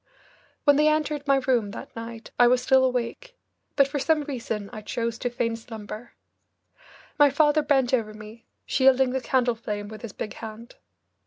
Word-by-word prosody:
When 285 -2 +5
they 300 +1 +4
entered 300 -1 0
my 275 - +5
room 255 -5 +1
that - - -9
night 230 0 -8
I 245 - +7
was 250 0 +3
still 265 0 +4
awake, 260 - -2 0.4
but 275 -1 +5
for 285 +1 -3
some 305 +2 +2
reason 230 -7 -4
I 215 - -6
chose 230 +2 -3
to 245 - -1
feign 240 -1 -1
slumber. 225 0 -9 1.1
My 290 -1 +7
father 295 +2 +3
bent 270 -4 +2
over 225 -4 +1
me, 215 +2 -12 0.2
shielding 265 -1 +4
the 265 0 -1
candle 250 -2 +1
flame 210 -2 -5
with 215 -1 -10
his 230 - -7
big 210 - -5
hand. 225 +1 -10
245 Hz, 175 wpm, -25 LUFS, 230-275 Hz, 1.1 s, I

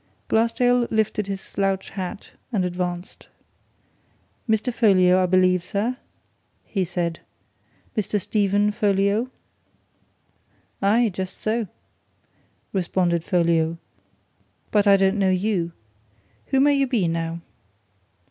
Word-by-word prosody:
Glassdale 235 +2 +2
lifted 215 -2 0
his 195 -1 -4
slouch 195 -1 -2
hat 195 +2 -6 0.2
and 195 -6 0
advanced. 180 0 -4 1.2
"Mr. 220 +3 +1
Folliot, 185 -6 +4
I 185 - +2
believe, 185 -1 +3
sir?" 210 +7 -2 0.7
he 195 -3 -1
said. 175 -1 -2 0.8
"Mr. 210 -1 0
Stephen 205 +1 +1
Folliot?" 205 +3 +1 1.5
"Aye, 220 +4 +3
just 185 0 -5
so!" 220 0 -1 1.1
responded 175 -3 0
Folliot. 170 -2 +1 0.9
"But 205 -1 +3
I 200 0 +7
don't 195 +1 +2
know 195 -1 +3
you. 185 -2 0 0.8
Who 270 - +2
may 285 +1 +5
you 275 -1 +2
be, 230 -9 +1
now?" 165 0 -3
195 Hz, 105 wpm, -23 LUFS, 180-220 Hz, 1.5 s, I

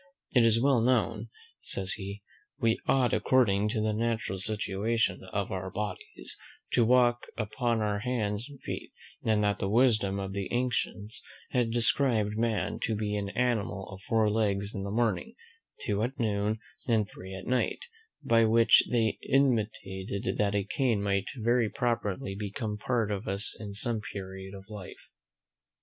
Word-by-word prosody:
It 125 - +6
is 115 0 +4
well 130 -1 +4
known," 115 -2 +1 0.3
says 95 -1 -2
he, 100 0 -5 0.3
"we 115 -2 +2
ought, 130 -2 +3
according 105 -5 +3
to 110 0 -1
the 110 0 +1
natural 110 -3 -1
situation 105 0 0
of 100 -2 -2
our 95 0 -3
bodies, 105 -1 -6 0.3
to 120 - +4
walk 120 0 +4
upon 115 +1 0
our 105 -1 0
hands 110 -2 -1
and 140 -2 -12
feet: - - -5 0.3
and 110 -1 +2
that 105 0 +1
the 95 - -1
wisdom 110 -4 +3
of 95 0 -4
the 100 -1 -3
ancients 120 -3 -1 0.3
had 125 -2 +2
described 115 -2 +2
man 110 -5 0
to 110 - 0
be 105 0 -1
an 100 -1 -2
animal 105 -4 -1
of 95 -1 -9
four 110 +3 +2
legs 100 -2 0
in 100 - -4
the 100 - -4
morning, 115 - 0 0.5
two 105 0 0
at 125 +4 -2
noon, 105 -1 +1 0.3
and 110 -4 +2
three 95 -1 -9
at 95 - -8
night; 130 - 0 0.4
by 115 0 +4
which 115 +1 +6
they 115 -3 +1
intimated 105 -7 0
that 105 -1 +2
a 100 - +2
cane 115 -3 0
might 100 -1 +1
very 120 0 +2
properly 105 -6 -1
become 105 +2 -4
part 110 0 0
of 100 +1 -3
us 100 +2 0
in 100 -2 -7
some 115 +1 -1
period 95 -1 -7
of 95 0 -11
life." 105 -4 -10
105 Hz, 160 wpm, -29 LUFS, 100-115 Hz, 0.5 s, It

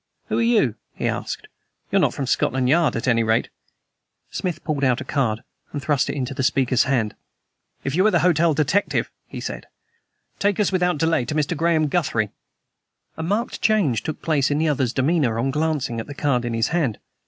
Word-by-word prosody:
"Who - - +1
are - - +2
you?" 225 - +3 0.2
he - - -2
asked. - - -3 0.4
"You're - - +4
not - - +1
from - - -2
Scotland 130 0 +1
Yard, 155 -1 +3
at 115 - -3
any 115 -2 +4
rate!" 110 +1 +1 0.8
Smith 175 -4 -3
pulled 150 -3 -2
out 130 -2 +3
a - - -4
card 115 -7 -1 0.3
and 145 - -3
thrust 140 -1 +1
it - - -2
into 130 -1 -3
the 135 - -3
speaker's 130 -2 +2
hand. 120 -6 0 0.7
"If 135 - -2
you 185 +4 +3
are - - +5
the - - +2
hotel 170 -3 +3
detective," 160 +7 +1 0.2
he - - -7
said, - - -6 0.7
"take 200 0 +1
us 210 - +2
without 180 -3 +1
delay 160 -3 +2
to 150 - -3
Mr. 155 +2 0
Graham 160 0 +2
Guthrie." 135 - 0 0.8
A - - -6
marked 205 +9 -1
change 185 - +2
took 155 - -5
place 150 -4 +2
in 145 - +1
the 160 +1 +2
other's 130 -5 +1
demeanor 130 -3 +1
on 135 +4 0
glancing 150 -5 -1
at 110 - -5
the 145 - -8
card 135 -5 +1
in 120 -1 -2
his 115 0 +1
hand. 155 -11 0
145 Hz, 200 wpm, -22 LUFS, 125-165 Hz, 0.8 s, are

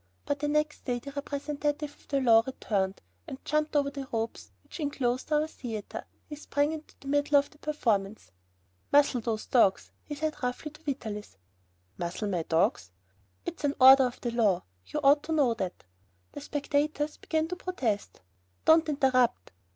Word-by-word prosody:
But 285 0 -1
the 295 - -1
next 300 +1 0
day 245 -2 0
the 280 +4 -8
representative 290 +1 -3
of - - -25
the 275 - +1
law 230 -3 +6
returned, 195 -7 -1 0.3
and 265 - -6
jumping 305 0 +1
over 280 -1 +1
the 275 -2 -6
ropes 225 0 -3
which - - -11
inclosed 270 -3 -1
our 300 0 +3
theater, 235 -9 -6 0.2
he 300 - -7
sprang 290 0 0
into 315 -1 -8
the 275 - -12
middle 290 +1 +3
of 285 0 +1
the 300 - -21
performance. 215 - -1 0.6
"Muzzle 285 -4 +4
those 220 -1 -2
dogs," 215 -6 +3
he 295 - -6
said 305 +1 -3
roughly 250 +4 -3
to 305 +1 -17
Vitalis. 220 - -5 0.6
"Muzzle 175 +4 -3
my 180 -4 0
dogs!" 160 - +1 0.6
"It's - - -6
an 285 -1 +1
order 265 0 +9
of 245 - -9
the 240 - -2
law, 215 -6 +2 0.2
you 300 - -3
ought 285 +2 +6
to 320 - -2
know 280 -6 +3
that!" 190 -5 -5 0.5
The 290 - -8
spectators 295 +1 -1
began 315 0 -1
to 360 - -2
protest. 260 - -3 0.4
"Don't 320 0 +5
interrupt!" 255 - +2
280 Hz, 170 wpm, -29 LUFS, 230-300 Hz, 0.6 s, order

